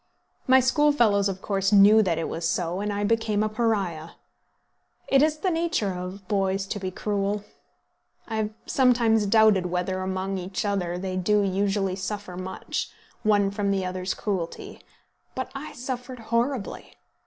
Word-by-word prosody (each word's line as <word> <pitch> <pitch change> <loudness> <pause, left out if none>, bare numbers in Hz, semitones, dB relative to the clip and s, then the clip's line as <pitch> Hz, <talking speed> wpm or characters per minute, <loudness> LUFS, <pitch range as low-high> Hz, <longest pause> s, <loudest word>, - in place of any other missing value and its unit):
My 260 0 +7
schoolfellows 250 -7 +3
of 190 0 -6
course 195 -1 0
knew 205 +2 +7
that 175 -6 0
it 165 - -2
was 165 0 -2
so, 175 +1 -1
and 205 +1 -2
I 205 0 -2
became 220 -1 +1
a 215 - 0
Pariah. 200 -8 -1 0.9
It 275 - +4
is 310 0 +2
the 365 +4 0
nature 330 - 0
of 180 +2 -7
boys 195 -1 0
to 205 - -5
be 190 -1 -3
cruel. 205 +1 -2 0.8
I 225 - -3
have 215 -1 0 0.2
sometimes 235 -5 +3
doubted 215 -3 +4
whether 180 +1 -2
among 190 +1 -2
each 185 +3 -4
other 180 -4 -1
they 185 0 -3
do 205 +3 +2
usually 195 0 0
suffer 195 -1 -5
much, 185 +1 -4 0.3
one 205 -3 +3
from 200 0 -1
the 195 -1 0
other's 185 0 -3
cruelty; 185 -5 -4 0.5
but 260 - -4
I 280 +2 -7
suffered 250 0 -5
horribly! 235 0 -2
200 Hz, 155 wpm, -25 LUFS, 185-225 Hz, 0.9 s, My